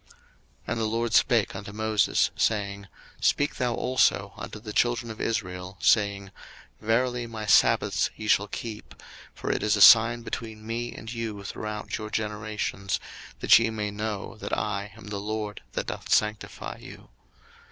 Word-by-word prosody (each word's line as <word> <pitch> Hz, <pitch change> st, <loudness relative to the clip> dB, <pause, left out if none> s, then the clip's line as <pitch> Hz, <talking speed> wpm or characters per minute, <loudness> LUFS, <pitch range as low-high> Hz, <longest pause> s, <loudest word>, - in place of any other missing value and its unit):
02:031:012 -, -, -24 dB, 0.5 s
And 120 Hz, -, -2 dB
the 110 Hz, -, 0 dB
LORD 115 Hz, +1 st, -1 dB
spake 115 Hz, -6 st, +3 dB
unto 100 Hz, +1 st, -7 dB
Moses, 110 Hz, -1 st, +1 dB
saying, 100 Hz, -2 st, -1 dB, 0.3 s
02:031:013 -, -, -13 dB
Speak 145 Hz, -, +2 dB
thou 125 Hz, -2 st, 0 dB
also 130 Hz, 0 st, +2 dB
unto -, -, -8 dB
the 105 Hz, -1 st, -8 dB
children 120 Hz, 0 st, +1 dB
of 110 Hz, -, -8 dB
Israel, 90 Hz, -4 st, -3 dB
saying, 100 Hz, -2 st, +2 dB, 0.5 s
Verily 120 Hz, +2 st, 0 dB
my 110 Hz, -2 st, -6 dB
sabbaths -, -, +4 dB
ye 110 Hz, -, -7 dB
shall 100 Hz, 0 st, +3 dB
keep: 110 Hz, +1 st, -7 dB, 0.4 s
for -, -, -3 dB
it -, -, -1 dB
is 105 Hz, 0 st, +2 dB
a -, -, -1 dB
sign 115 Hz, +2 st, +8 dB
between 110 Hz, -2 st, -6 dB
me 120 Hz, +1 st, -3 dB
and 110 Hz, +2 st, -8 dB
you 110 Hz, -4 st, -4 dB
throughout 105 Hz, +2 st, -5 dB
your 110 Hz, 0 st, -6 dB
generations; 105 Hz, -2 st, -2 dB, 0.4 s
that -, -, +7 dB
ye 115 Hz, 0 st, +1 dB
may 105 Hz, -2 st, -3 dB
know 105 Hz, 0 st, -4 dB
that -, -, -3 dB
I 100 Hz, -1 st, -3 dB
am 110 Hz, -2 st, -11 dB
the 105 Hz, -, -3 dB
LORD 105 Hz, 0 st, -4 dB
that -, -, -2 dB
doth -, -, -6 dB
sanctify 105 Hz, -1 st, 0 dB
you. -, -, -12 dB
110 Hz, 165 wpm, -27 LUFS, 105-115 Hz, 0.5 s, sign